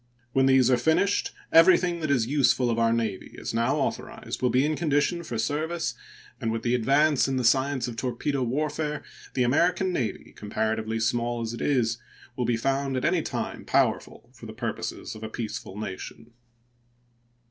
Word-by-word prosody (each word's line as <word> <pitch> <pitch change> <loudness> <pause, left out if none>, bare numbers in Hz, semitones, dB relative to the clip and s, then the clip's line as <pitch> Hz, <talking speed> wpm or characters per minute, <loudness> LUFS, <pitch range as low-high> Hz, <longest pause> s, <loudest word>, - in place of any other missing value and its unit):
When 135 0 +4
these 130 -1 +5
are 125 - +5
finished, 160 +10 +2 0.2
everything 175 +1 +5
that 155 -2 -2
is 130 -5 +2
useful 125 -2 +2
of 115 - 0
our 115 0 +3
Navy, 115 -4 -2
as - - -5
now 115 +1 +1
authorized, - - -3
will 125 - +3
be 130 +3 +3
in 155 +1 0
condition 155 +2 +1
for 120 -8 -5
service, 150 +1 -1 0.5
and 115 -4 -1
with 115 0 -3
the 120 - +1
advance 140 +5 +3
in 135 -1 -1
the 130 - 0
science 130 +2 +2
of 115 -2 -7
torpedo 130 +3 -2
warfare 150 +4 -2 0.3
the 125 - +2
American 175 +8 +2
Navy, 120 -9 -3
comparatively 110 +1 -2
small 120 +1 0
as 115 0 -3
it 120 - -6
is, 120 -5 +1 0.4
will 125 - -1
be 120 -1 +1
found 135 +2 0
at 130 - -1
any - - +2
time - - -4
powerful - - 0
for - - -11
the - - -8
purposes - - -4
of 110 - -10
a 110 - -5
peaceful 110 -3 -6
nation. 110 +3 -7
125 Hz, 180 wpm, -26 LUFS, 115-145 Hz, 0.5 s, these